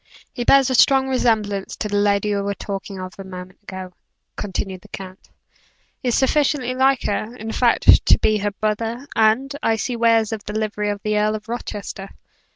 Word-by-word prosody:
"He 245 - -3
bears 270 0 +5
a - - +1
strong 265 +1 +4
resemblance 215 -6 0
to 215 - -3
the 205 -1 -1
lady 205 0 +2
we 200 - 0
were 200 0 -2
talking 195 -1 -6
of 185 0 -7
a - - -5
moment 185 -1 -10
ago," 190 -2 -8 0.4
continued 190 -1 -4
the - - -16
count 190 -1 -10 0.7
"is 245 -3 0
sufficiently 270 -2 +1
like 265 0 +2
her, 215 +3 -2
in 225 -2 -6
fact, 240 0 +5
to - - +7
be 215 -1 +1
her 205 +1 0
brother; 225 +5 -3
and, 225 +6 +2
I 225 - +2
see 240 +3 -3
wears 230 -2 +3
the 210 -1 -5
livery 210 -1 -2
of 205 0 -4
the 210 -1 +1
Earl 215 +1 +1
of 215 0 -8
Rochester." 205 -4 -6
215 Hz, 185 wpm, -21 LUFS, 200-240 Hz, 0.7 s, to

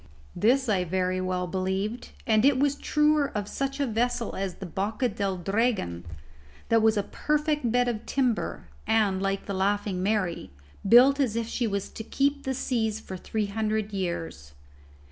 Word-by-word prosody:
This 260 +4 +3
I 195 -4 +2
very 185 +1 -1
well 185 -1 -1
believed, 190 +5 -2 0.2
and 215 -1 +3
it 275 -1 +5
was 285 +1 +2
truer 300 0 +2
of 205 -1 -3
such 275 +4 -3
a 285 - +2
vessel 240 0 -1
as 190 -2 -3
the 195 - -8
Boca 205 - -1
del 195 -2 -2
Dragon 195 - -1 0.6
that 230 -1 +4
was 220 0 +3
a 205 - +1
perfect 300 -3 0
bed 245 +1 +2
of 230 -2 -3
timber, 250 - -1 0.2
and, 205 -4 +2
like 195 0 -1
the 200 - -4
Laughing 195 0 0
Mary, 195 -3 -1 0.4
built 260 +5 +7
as 250 -6 +1
if 230 -1 -1
she 235 0 -1
was 200 -2 -2
to 220 - -7
keep 280 +4 0
the 265 0 -1
seas 220 -4 -1
for 190 - -8
three 215 +3 -2
hundred 215 0 -2
years. 170 - -4
215 Hz, 170 wpm, -27 LUFS, 190-245 Hz, 0.6 s, built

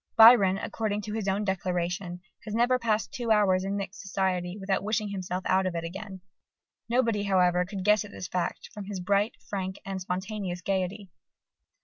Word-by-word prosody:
Byron, 220 -4 +8
according 210 0 -2
to 210 - -5
his 215 -2 -2
own 195 +2 +1
declaration, 180 -1 -2 0.2
has 215 -1 -4
never 245 +2 +3
passed 220 -3 0
two 240 -2 -3
hours 200 -4 +4
in 195 +1 -2
mixed 195 -1 -5
society 185 -1 -1
without 195 -1 -1
wishing 215 +1 -1
himself 185 -2 -3
out 190 0 +2
of 180 - -3
it 165 - -2
again. 190 +2 -7 0.7
Nobody, 230 -3 +2
however, 180 -3 +3
could 195 0 -5
guess 210 -1 +5
at 210 - -10
this 180 - -7
fact 180 -1 -3
from 210 -3 -7
his 200 -1 -5
bright, 200 +4 +1
frank, 190 -1 -3
and 195 -1 -4
spontaneous 185 0 -3
gaiety. 190 +1 -2
195 Hz, 175 wpm, -28 LUFS, 185-210 Hz, 0.7 s, Byron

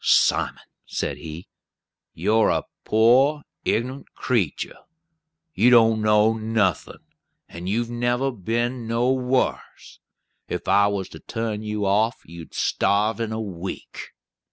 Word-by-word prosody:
"Simon," - - +2 0.2
said - - -3
he, 80 +2 -9 0.6
"you're 110 +1 +2
a - - +1 0.2
poor 130 +7 +4 0.2
ignunt 130 +5 -2
creetur. 115 - -1 0.8
You 120 - +4
don't 115 -2 +5
know 105 +1 +4
nothin', 110 -6 -1 0.4
and 85 +2 -7
you've 115 +3 -1
never 120 +3 0
been 120 +3 -2
nowhars. 125 +2 -1 0.5
If - - -5
I 100 0 +5
was 100 -2 -2
to 80 - -11
turn 115 0 -4
you 105 -1 -3
off, 110 +5 +1
you'd 85 0 -11
starve 105 +2 +1
in 115 -1 -2
a 110 - -3
week." 95 -4 -7
110 Hz, 120 wpm, -23 LUFS, 100-120 Hz, 0.8 s, don't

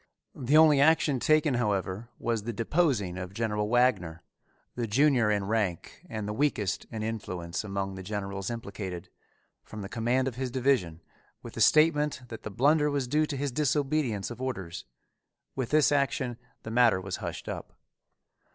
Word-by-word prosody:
The 135 +4 +2
only 155 -3 +6
action 150 -3 +4
taken, 155 +1 +3
however, 105 -2 -1
was 115 -2 -1
the 115 +3 -4
deposing 115 - 0
of 90 +1 -7
General 105 -2 -1
Wagner, 105 -10 +1 0.5
the 120 -2 -3
junior 125 0 +3
in 100 -2 +1
rank 100 -5 -2
and 110 -2 -4
the 105 - -3
weakest 110 -7 0
in 110 -2 -5
influence 90 -6 -4
among 100 -1 -3
the 95 - -7
generals 100 -1 -4
implicated, 100 -6 -6 0.5
from 105 -2 -9
the - - -5
command 120 +3 0
of 125 -3 -4
his 130 -1 -2
division, 120 -11 0 0.4
with - - -9
the - - -4
statement 150 -3 +4
that 115 - -8
the - - -6
blunder 150 +8 +3
was 140 -3 -1
due 150 +4 +1
to 145 - -4
his 140 0 -2
disobedience 140 -5 0
of 120 - -8
orders. 95 -10 -5 0.7
With 130 -3 -2
this 155 -1 +4
action 130 -4 0 0.2
the 110 - -6
matter 115 -4 +4
was 95 0 -5
hushed - - -6
up. - - -7
115 Hz, 165 wpm, -28 LUFS, 100-140 Hz, 0.7 s, only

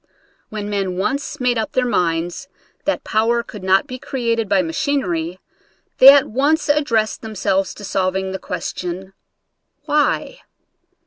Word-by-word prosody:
When 210 -1 -5
men 195 -3 -2
once 275 +8 -2
made 250 -2 +1
up 220 - -3
their 255 - +2
minds 175 +1 -1 0.4
that 295 - 0
power 230 +2 +1
could 210 -4 -10
not 190 +1 +3
be 255 0 -7
created 230 -5 -2
by 195 -2 +3
machinery, 175 - -2 0.6
they 270 +1 +11
at 280 -1 +4
once 295 +6 +1
addressed 250 -8 +1
themselves 195 -3 -1
to 205 - -11
solving 190 -1 -1
the 190 - -4
question 185 +2 -5 0.3
— 290 - -51
Why? 300 +11 0
215 Hz, 140 wpm, -20 LUFS, 190-265 Hz, 0.6 s, they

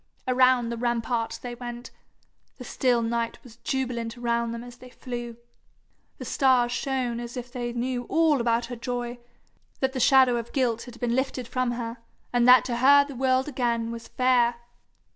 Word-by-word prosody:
Around 255 -1 +3
the 235 - -4
rampart 235 -1 -1
they 245 -1 -5
went. 240 0 -8 0.7
The 250 - -9
still 245 -1 +1
night 230 0 -2
was 235 -3 -15
jubilant 240 -2 -3
around 235 -1 -1
them 230 0 -6
as 245 0 -12
they 255 - -13
flew. 240 -2 -7 0.8
The - - -8
stars 255 -3 +3
shone 250 -2 -2
as 240 +1 -7
if 245 0 -7
they 240 -2 -4
knew 245 +1 -3
all 320 -3 +2
about 235 0 +1
her 245 +1 -6
joy, 245 0 -4 0.6
that 265 0 0
the 260 - -3
shadow 260 -2 +5
of 235 0 -6
guilt 240 -5 0
had 245 -2 -12
been 240 -1 0
lifted 260 -2 -2
from 255 -1 -1
her, 235 0 -5 0.4
and 245 0 +3
that 250 -2 +8
to 240 -2 -2
her 280 +3 +6
the 280 - -9
world 260 +1 +1
again 235 -4 -1
was 230 0 -8
fair. 245 -2 +2
245 Hz, 180 wpm, -26 LUFS, 235-255 Hz, 0.8 s, that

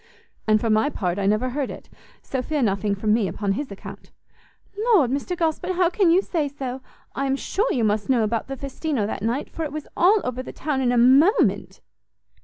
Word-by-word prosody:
"And 215 0 +4
for 225 0 0
my 215 +7 +3
part, 185 -8 -2
I 195 - 0
never 215 +5 +1
heard 275 +1 -2
it! - - -9 0.4
so 265 - -3
fear 295 +1 -1
nothing 200 -1 0
from 210 +2 +1
me 220 -3 +2
upon 200 0 -2
his 275 +8 -3
account." 200 - -10 0.7
"Lord, 415 - +3
Mr 285 +6 -2
Gosport, 340 +3 -1
how 355 -1 +2
can 370 -1 +3
you 360 +4 +4
say 320 -7 -1
so? 265 -2 -6 0.3
I 275 0 -2
am 270 - +1
sure 410 - -1
you 245 - 0
must 210 +1 0
know 245 -4 +3
about 225 +1 -1
the 270 0 -5
Festino 275 -3 -2
that 210 - -4
night, 235 +6 -1
for 325 - -4
it 300 - -4
was 305 0 -6
all 395 +5 +4
over 250 0 -3
the - - -9
town 285 -3 -2
in 245 -2 +2
a 245 - +1
moment." 275 - +3
265 Hz, 215 wpm, -23 LUFS, 220-310 Hz, 0.7 s, And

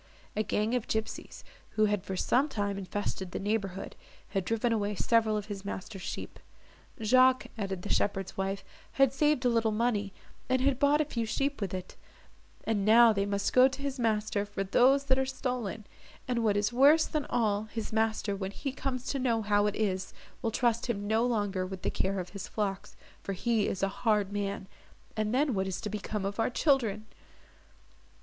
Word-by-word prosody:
A 215 - +1
gang 215 +1 0
of 245 -3 -1
gipsies, 220 0 -4 0.3
who 215 - +5
had 205 -3 0
for 190 - -4
some 270 +10 +2
time 205 -5 -2
infested 190 0 -4
the - - -4
neighbourhood, 195 -2 -2 0.3
had 195 -1 -1
driven 230 +2 +1
away 210 -1 -1
several 225 0 +2
of 210 - -4
his 205 -2 -6
master's 195 0 -6
sheep. - - -6 0.6
"Jacques," 255 +3 +5
added 195 -4 -4
the 205 - -5
shepherd's 195 -2 -1
wife, 195 +1 -2 0.3
"had 270 -2 +4
saved 295 -2 +2
a - - +5
little 230 -1 +2
money, 210 -2 0 0.4
and 260 0 +3
had 265 0 +1
bought 290 +2 +4
a - - +1
few 235 -6 -3
sheep 275 +4 -1
with 195 -3 -2
it, 185 -1 -6 0.7
and 215 -3 0
now 225 +2 +7
they 200 -1 0
must 200 0 -1
go 255 +1 +7
to 270 +1 -6
his 275 -1 -3
master 215 -3 +1
for 205 -1 -4
those 255 +8 +4
that 265 -1 +2
are 265 - +1
stolen; 250 -5 -3 0.4
and 240 -2 0
what 205 -2 +2
is 205 +3 0
worse 290 +6 +6
than 305 -2 -2
all, 215 -3 +1
his 220 0 -6
master, 220 -2 0
when 190 -1 -4
he 275 +7 -4
comes 255 -1 -4
to 275 - -2
know 230 -4 +1
how 205 0 +3
it 210 - -1
is, 190 -3 -2 0.3
will 230 - 0
trust 235 +1 +1
him 205 -4 -2
no 220 +2 +2
longer 205 -6 0
with 185 0 -6
the - - 0
care 195 0 -1
of 180 -1 -5
his 200 -1 -7
flocks, 200 -1 -3 0.3
for 195 - -4
he 220 +2 +1
is 195 - -3
a - - +4
hard 210 -4 +2
man! 200 -1 -2 0.5
and 215 -1 -1
then 270 +2 +2
what 190 -1 0
is 185 -1 -3
to 210 - -5
become 210 -1 -3
of 200 +2 -4
our 225 - +2
children!" 235 -6 +1
215 Hz, 200 wpm, -30 LUFS, 200-245 Hz, 0.7 s, now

